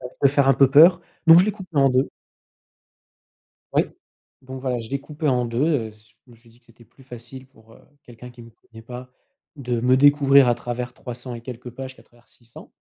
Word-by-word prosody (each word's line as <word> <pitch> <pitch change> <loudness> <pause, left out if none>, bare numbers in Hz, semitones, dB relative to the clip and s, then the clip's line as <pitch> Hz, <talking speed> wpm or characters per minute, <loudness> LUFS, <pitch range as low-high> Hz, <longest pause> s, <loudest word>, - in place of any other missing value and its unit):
ça 125 - -8
peut 140 - +5
faire 140 0 +1
un 135 - +5
peu 135 0 +3
peur», 170 +5 +6 0.3
donc 165 +1 +8
je 185 - +2
l'ai - - +1
coupé 190 -6 -12
en 135 -1 +4
2. 130 +1 0 1.7
Oui, - - +3 0.6
donc, 130 0 -9
voilà, 130 -2 -3
je 115 - -10
l'ai 140 0 -3
coupé 150 +2 -7
en 125 -2 +1
2, 115 +2 -4 0.3
heu, 110 - -15
z 110 +1 -24 0.2
je 125 - -21
me 115 - -18
suis 115 0 -24
dit 120 +2 -26
que 120 - -36
c'était 115 0 -21
plus 135 - -23
facile, 125 +1 -12
pour, 115 -4 -23
heu, - - -20 0.2
quelqu'un 125 +1 -13
qui 120 -1 -15
me 115 - -15
connait 115 0 -18
pas, 125 +2 -10 0.5
de 125 -4 -3
me 125 +2 +3
découvrir 140 -1 +5
à 120 - +2
travers 120 +1 -6
trois 125 - -9
cents 125 0 -9
et 115 - -9
quelques 125 0 -10
pages 130 +2 -9
qu'à - - -19
travers 120 0 -28
600. 115 -1 -17
125 Hz, 235 wpm, -22 LUFS, 120-135 Hz, 1.7 s, donc